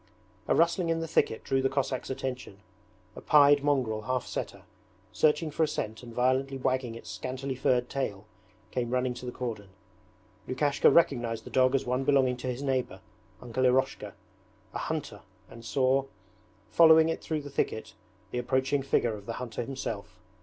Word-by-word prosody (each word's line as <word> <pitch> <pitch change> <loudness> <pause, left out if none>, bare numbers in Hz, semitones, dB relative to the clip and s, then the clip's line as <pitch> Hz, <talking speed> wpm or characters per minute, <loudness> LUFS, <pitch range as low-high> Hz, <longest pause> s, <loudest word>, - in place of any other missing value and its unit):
A - - +3
rustling 170 +1 +2
in 165 0 +1
the 165 - -3
thicket 135 -8 +1
drew 135 0 +1
the 135 - +1
Cossack's 135 -1 -2
attention. 130 -6 -5 0.5
A - - -9
pied 145 -1 +5
mongrel 130 -7 +1
half 125 +3 -2
setter, - - -5 0.5
searching 155 +1 +2
for 155 - -3
a 160 - +4
scent 110 -7 -4
and 120 -1 -10
violently 130 +3 +1
wagging 130 -3 -1
its 115 - -11
scantily 130 +1 -4
furred 125 -1 +1
tail, 105 -8 -3 0.5
came 120 -2 -2
running 125 0 0
to 125 +1 -8
the - - -3
cordon. 115 -6 -5 0.8
Lukashka 140 +2 +3
recognized 120 -8 +2
the - - -11
dog 130 0 +3
as 135 0 0
one 125 +2 0
belonging 135 -2 +3
to 125 - -6
his 125 +2 -3
neighbour, 130 -2 -1 0.4
Uncle 125 +1 -2
Eroshka, 130 +1 0 0.6
a - - -3
hunter, - - -4 0.3
and 115 - -11
saw, 130 +3 +1 0.6
following 160 +5 +6
it 165 - -2
through 155 -2 -2
the 145 0 -9
thicket, 110 -4 -2 0.4
the 125 - -2
approaching 130 +3 0
figure 120 -4 +1
of 100 -1 -9
the 115 - -3
hunter 120 -1 -5
himself. 115 -5 -6
130 Hz, 170 wpm, -29 LUFS, 120-140 Hz, 0.8 s, following